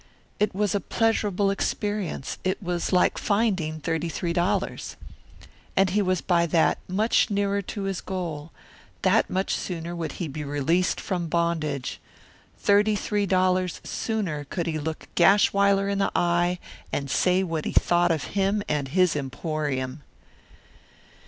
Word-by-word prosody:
It 210 -2 +1
was 205 -2 +1
a 205 - +1
pleasurable 205 -3 +1
experience; 205 -6 -2
it 185 0 0
was 175 -1 -2
like 180 -1 +3
finding 190 -8 0
thirty 165 +2 -2
three 170 +1 -2
dollars. 175 +1 -1 0.8
And 190 -1 +4
he 210 +2 +2
was 185 -3 +1
by 170 -2 +2
that 165 0 +2
much 210 +7 +2
nearer 200 0 0
to 200 +1 -5
his 195 -2 -2
goal; 165 -5 -5 0.5
that 195 +4 +3
much 190 +1 -1
sooner 170 -1 -4
would 165 -2 -4
he 175 - -4
be 150 +1 -5
released 145 +5 +1
from 180 -4 -2
bondage; 160 -5 -1 0.6
thirty 210 +1 +3
three 205 0 -1
dollars 185 -1 +1
sooner 195 -10 -2
could 170 +4 -3
he 160 -2 -2
look 160 +1 -5
Gashwiler 200 +1 +4
in 200 0 -1
the 195 - +1
eye 175 +1 +2 0.3
and 140 - -2
say 180 +6 +2
what 165 -4 -3
he - - -1
thought 175 0 +3
of 160 -3 0
him 200 +1 +1
and 145 -2 -1
his 180 +4 +2
emporium. 140 -1 -3
180 Hz, 145 wpm, -25 LUFS, 160-200 Hz, 0.8 s, And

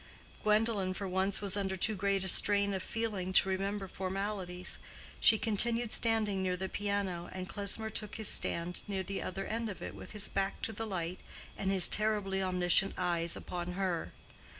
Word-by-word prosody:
Gwendolen 210 -3 +1
for 195 - -4
once 190 +2 0
was 200 -2 +1
under 190 -2 -2
too 215 +4 +1
great 195 0 0
a - - -4
strain 200 +2 +5
of 190 - -2
feeling 210 -5 -3
to 190 - +5
remember 195 +1 -2
formalities. 190 -1 -4 0.4
She 220 - +6
continued 230 +2 0
standing 215 -4 +2
near 185 -1 -1
the 190 +1 -3
piano, 200 -4 -3
and 185 0 -6
Klesmer 205 +3 +2
took 210 -1 -5
his 220 -2 -1
stand 170 +1 0
near 195 -2 -2
the 195 +2 -5
other 195 +1 -5
end 225 0 -3
of 200 - -7
it - - -7
with - - -11
his 210 -2 +4
back 195 0 -2
to 225 - -2
the 225 +2 -4
light 180 -2 -4 0.4
and 195 - -3
his 190 -3 +9
terribly 205 -2 +1
omniscient 180 +1 +2
eyes 170 -2 +1
upon 180 0 -5
her. 180 -3 -2
195 Hz, 180 wpm, -32 LUFS, 185-210 Hz, 0.4 s, his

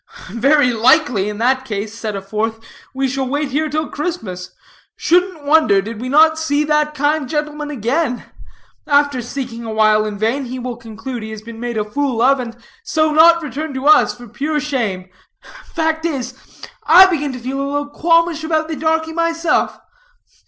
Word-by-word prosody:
"Very 275 +2 +3
likely, 235 -3 +3
in 210 - -6
that 260 +3 +1
case," 210 -3 -5
said 225 -2 -5
a 195 - -5
fourth, 220 +3 -3 0.3
"we 270 0 -1
shall 265 0 -2
wait 285 +1 -2
here 310 +3 0
till 310 +1 -2
Christmas. 215 - -5 0.5
Shouldn't 355 -3 +1
wonder, 290 -9 +4
did 220 +3 -6
we 255 - -4
not 315 +3 +5
see 295 -2 0
that 300 0 0
kind 295 -1 0
gentleman 300 0 -3
again. 255 +1 -1 0.6
After 285 -3 +2
seeking 240 -1 -6
awhile 215 -1 +2
in 210 -1 -5
vain, 235 +7 -1
he 255 +1 -6
will 250 -1 -5
conclude 235 +1 -7
he 220 - -7
has 215 -1 -8
been 230 0 -10
made 240 -1 -4
a 210 - -1
fool 265 +1 -2
of, 270 +3 +4
and 235 -2 -6 0.3
so 310 -1 +1
not 335 +2 +6
return 295 +1 -5
to 260 +1 -4
us 305 -4 +5
for 245 0 -12
pure 295 +7 -2
shame. 230 -11 -3 0.6
Fact 320 -1 -2
is, 265 -6 -3 0.5
I 360 +4 +9
begin 300 -6 -1
to 250 - -7
feel 265 +3 -4
a 275 - -2
little 290 0 -2
qualmish 330 0 +2
about 315 0 -1
the 320 - -3
darkie 320 +2 -1
myself. 335 -1 0
275 Hz, 180 wpm, -18 LUFS, 230-310 Hz, 0.6 s, I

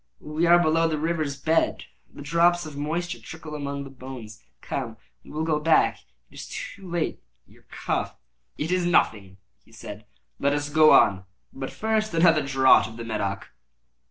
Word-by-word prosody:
We 155 +3 -1
are 175 +1 +7
below 165 -1 +3
the 155 -1 -1
river's 155 -3 -2
bed. 160 +3 +1 0.3
The - - -10
drops 170 +3 +2
of 155 -2 -9
moisture 170 +5 -3
trickle 160 -1 -9
among 140 -1 -4
the 135 - -10
bones. 125 -5 -10 0.2
Come, 115 -5 -5 0.3
we - - -16
will 155 +1 -3
go 155 -2 0
back 160 +1 +3
ere - - -25 0.2
it - - -12
is - - -8
too 195 -3 -8
late. 170 -1 -2 0.2
Your - - -23
cough—" - - -3 0.4
"It 155 +4 -3
is 185 -1 +1
nothing," 100 - +1 0.3
he - - -24
said; 105 -2 -10 0.3
"let 140 +1 +2
us 145 0 -2
go 155 +1 +6
on. 95 -2 +5 0.3
But 135 0 -5
first, 215 -3 -1
another 165 -2 +5
draught 135 -3 +4
of 110 +1 -11
the 115 - -6
Medoc." 100 -3 -3
150 Hz, 180 wpm, -25 LUFS, 130-165 Hz, 0.4 s, are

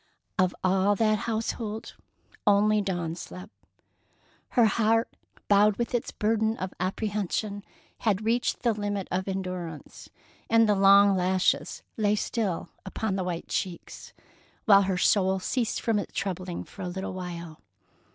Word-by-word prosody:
Of 185 -1 +2
all 190 +2 +3
that 215 0 +2
household, 220 -1 -3 0.5
only 210 +1 +4
Dawn 175 -4 -2
slept. 180 +3 -9 1.1
Her 240 - +7
heart, 225 +2 +2 0.3
bowed 205 0 +4
with 235 0 -2
its 240 - -1
burden 220 +1 0
of 185 0 -5
apprehension, 205 +1 -2 0.4
had 215 -1 0
reached 235 +2 0
the 235 -2 +3
limit 205 -2 -3
of 185 +1 -1
endurance, 180 -5 -5 0.4
and 225 0 +5
the 210 - +4
long 200 0 +6
lashes 185 0 0
lay 210 -1 +2
still 210 -4 -2
upon 195 +1 -3
the 190 - -1
white 175 -2 -4
cheeks, 180 -3 -4 0.5
while 200 -2 +7
her 190 -1 0
soul 190 0 +3
ceased 230 +5 -1
from 225 -3 +1
its - - -6
troubling 185 -2 -3
for 200 - -12
a 180 - -3
little 190 +2 -5
while. 170 -3 -7
200 Hz, 140 wpm, -27 LUFS, 185-215 Hz, 1.1 s, Her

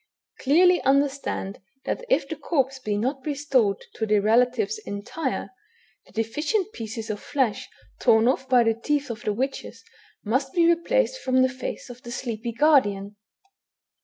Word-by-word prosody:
Clearly 355 +6 +4
understand, 275 -7 0 0.2
that - - -2
if - - +2
the 320 - -4
corpse 270 -3 -1
be 210 -4 -2
not 260 +5 -2
restored 275 -9 0
to 220 - -3
the 210 0 +3
relatives 250 - +2
entire, 260 - -4 0.6
the - - -19
deficient 300 - -1
pieces 225 -1 -5
of 205 - -5
flesh 260 -6 -1 0.3
torn 225 -2 +4
oflf 265 +1 +1
by 250 -2 +5
the 225 0 +2
teeth 280 +4 -1
of 230 - -7
the 210 - -1
witches 265 +6 -4 0.4
must 265 +5 0
be 340 -1 +4
replaced - - +2
from 255 0 +3
the 260 - +3
face 255 0 -6
of 245 +1 -13
the 240 - -9
sleepy 235 -2 -4
guardian." 210 -8 +2
260 Hz, 155 wpm, -25 LUFS, 225-290 Hz, 0.6 s, by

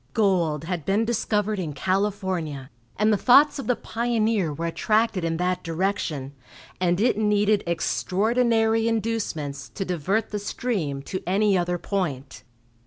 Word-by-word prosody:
Gold 175 -8 +2
had 170 -2 -3
been 200 +8 +1
discovered 215 -2 0
in 160 -5 -3
California, 185 -6 -2 0.3
and 215 +1 +3
the - - +2
thoughts 280 +7 +5
of 275 - -5
the 250 - +2
pioneer 225 -7 0
were 165 +3 -4
attracted 215 +3 +1
in 165 -1 -1
that 180 +1 0
direction, 165 -5 -2 0.5
and 175 0 +1
it 225 -1 +2
needed 210 -1 +2
extraordinary 225 +6 +1
inducements 200 -11 -2
to 195 - -5
divert 185 +5 -1
the 210 - -2
stream 190 - -3
to 185 +5 -5
any 200 +2 +3
other 175 -1 0
point. 140 - -3
195 Hz, 140 wpm, -24 LUFS, 165-220 Hz, 0.5 s, thoughts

